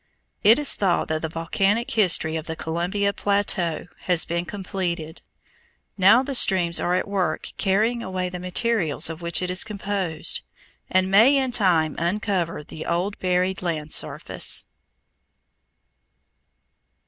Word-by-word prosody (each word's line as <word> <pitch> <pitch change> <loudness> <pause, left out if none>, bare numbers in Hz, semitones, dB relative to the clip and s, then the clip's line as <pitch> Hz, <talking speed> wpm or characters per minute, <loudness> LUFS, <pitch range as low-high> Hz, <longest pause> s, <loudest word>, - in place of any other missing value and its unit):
It 220 +3 +7
is 295 -1 +1
thought 185 -4 0
that 155 0 -1
the 160 - -3
volcanic 195 +8 -1
history 175 -7 +2
of 160 -1 -5
the 160 - -4
Columbia 180 +6 -1
plateau 200 -5 0 0.2
has 175 -3 +2
been 170 +1 -2
completed. 180 -4 -4 0.7
Now 210 +6 +5
the 275 +1 -4
streams 180 -8 +4
are 180 - 0
at 185 - -1
work 185 -5 -2
carrying 215 +5 +1
away 185 -4 -3
the 180 0 -7
materials 180 -3 0
of 165 +1 -9
which 170 +1 0
it 180 - -2
is 180 - +2
composed 195 -6 -3 0.5
and 185 0 +1
may 230 +8 +6
in 265 -2 0
time 170 -9 +2
uncover 175 -2 -1
the 155 - -9
old 180 +4 -2
buried 185 +1 0
land 160 -4 -3
surface. - - -1
185 Hz, 135 wpm, -23 LUFS, 170-205 Hz, 0.7 s, It